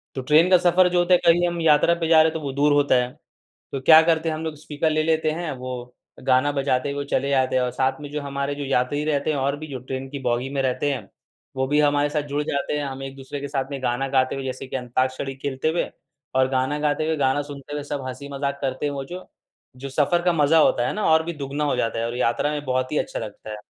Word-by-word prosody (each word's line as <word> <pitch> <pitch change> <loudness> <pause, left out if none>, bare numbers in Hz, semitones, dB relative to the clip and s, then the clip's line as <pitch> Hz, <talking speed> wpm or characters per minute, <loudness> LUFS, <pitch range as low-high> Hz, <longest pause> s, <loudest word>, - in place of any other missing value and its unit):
तो 130 - -3
ट्रेन 155 +7 +4
का 185 - +7
सफर 180 +1 +4
जो 175 0 +2
होता 175 +1 +3
है, 180 - +6
कहीं 175 +1 +5
हम 170 0 -3
यात्रा 160 +2 +4
पर 165 -1 -2
जा 165 - +5
रहे 160 - +4
हैं, - - -9
तो 160 - -3
वो 135 - -2
दूर 145 +1 +3
होता 145 -2 +3
है। 125 - -6 0.6
तो 135 - -3
क्या 160 +4 +8
करते 165 0 +1
हैं, 155 - -1
हम 160 - -5
लोग 160 -1 -3
स्पीकर 150 +1 -2
ले 155 0 +1
लेते 160 -1 +1
हैं, 165 +1 -3
वो 125 -1 -7 0.3
गाना 130 +3 +3
बजाते 135 -1 0
हुए 140 0 -3
चले 140 +2 0
जाते 130 -1 +2
हैं 130 - +3
और 125 - 0
साथ 130 +2 -1
में 145 -1 -8
जो 150 0 -3
हमारे 140 0 -3
जो 145 0 -5
यात्री 135 +2 0
रहते 150 0 0
हैं, 150 - 0
और 140 +1 0
भी 155 +1 -8
जो 130 - -4
ट्रेन 130 +1 -6
की 140 - -5
बोगी 120 +2 -1
में 135 - 0
रहते 130 +2 0
हैं, 135 - -6 0.5
वो 130 0 0
भी 150 +2 +2
हमारे 145 0 +2
साथ 150 -1 -1
जुड़ 145 +1 0
जाते 140 0 -2
हैं। 145 - -2
हम 135 0 -6
एक-दूसरे 135 +1 -7
के 140 - -5
साथ 135 -1 -3
में 135 -2 -5
गाना 125 +2 -1
गाते 130 -1 +1
हुए, 135 -1 -5
जैसे 130 +1 -5
कि 130 - -4
अंताक्षरी 130 +2 -2
खेलते 135 +2 -2
हुए 165 +2 -1 0.4
और 130 0 +3
गाना 130 +3 0
गाते 150 +1 0
हुए, 160 -1 0
गाना 140 +1 +1
सुनते 145 0 -10
हुए 145 - -3
सब 145 -2 -4
हँसी-मज़ाक 140 +2 -4
करते 135 +2 -2
हैं 145 - -1
वो 135 -1 -4
जो। 180 +6 -9 0.5
जो 140 - -4
सफर 150 +5 +1
का 175 -1 +3
मज़ा 155 0 +4
होता 120 -5 +3
है - - -1
ना, 210 - -2
और 160 0 +5
भी 170 - -3
दुगुना 145 +1 -3
हो 145 - +1
जाता 115 0 -1
है 115 - -1
और 120 +1 -4
यात्रा 125 +4 +1
में 145 -1 -4
बहुत 130 +1 -1
ही - - +1
अच्छा - - -3
लगता 110 0 -8
है। 105 - -5
140 Hz, 275 wpm, -23 LUFS, 130-155 Hz, 0.6 s, क्या